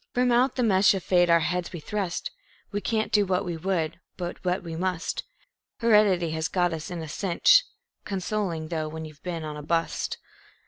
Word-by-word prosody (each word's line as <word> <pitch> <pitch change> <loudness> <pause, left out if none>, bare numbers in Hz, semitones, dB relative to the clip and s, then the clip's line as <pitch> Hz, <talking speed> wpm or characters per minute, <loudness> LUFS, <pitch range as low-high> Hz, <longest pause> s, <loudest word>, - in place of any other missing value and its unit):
From 250 0 +3
out 250 +2 +3
the 250 - +1
mesh 195 -2 +5
of 190 - -4
fate 175 -1 +3
our 170 0 +5
heads 175 +1 -1
we 175 - -6
thrust. 190 +1 -3 0.4
We 205 0 -2
can't 220 0 -1
do 210 - +4
what 190 0 0
we 175 -2 -3
would, 165 -2 -1 0.2
but 175 -1 -5
what 180 +1 0
we 165 -2 -6
must. 180 0 -2 0.5
Heredity 210 -7 +4
has 160 +1 -1
got 175 -2 +1
us 160 -1 -5
in 175 -2 -5
a - - -6
cinch 195 - +4 0.4
(Consoling 190 -4 -2
thought 155 -2 -3
when 160 0 -5
you've 155 -2 -13
been 170 -3 -4
on 150 -1 -5
a - - -6
"bust".) 165 +2 -1
180 Hz, 195 wpm, -26 LUFS, 165-200 Hz, 0.5 s, mesh